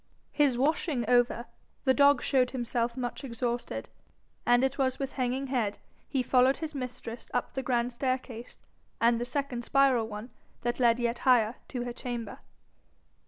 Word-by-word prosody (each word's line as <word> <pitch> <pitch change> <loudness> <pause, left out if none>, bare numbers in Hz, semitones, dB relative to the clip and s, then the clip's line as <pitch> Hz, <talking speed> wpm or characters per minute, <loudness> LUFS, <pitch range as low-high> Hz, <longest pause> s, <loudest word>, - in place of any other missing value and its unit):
His 285 -5 +2
washing 275 -3 0
over, 245 -1 +3 0.4
the 260 - +4
dog 285 +1 +5
showed 255 -3 +3
himself 240 -1 -2
much 245 +2 -4
exhausted, 240 -1 -3 0.6
and 245 +1 +5
it 265 +1 0
was 260 -1 +1
with 270 -1 -4
hanging 255 +1 -1
head 240 -6 -1 0.3
he 265 -3 0
followed 255 +2 +4
his 315 -1 -5
mistress 250 -3 -6
up 245 - -1
the 265 - -2
grand 245 -1 0
staircase 255 -2 -4 0.4
and 230 0 +4
the - - -1
second 260 -1 -3
spiral 265 -4 +3
one 215 +3 -7 0.3
that 240 +1 -1
led 235 -1 +4
yet 235 0 -1
higher 240 -3 +3
to 245 -2 -4
her 245 -1 -4
chamber. 235 -4 -5
250 Hz, 160 wpm, -29 LUFS, 240-265 Hz, 0.6 s, dog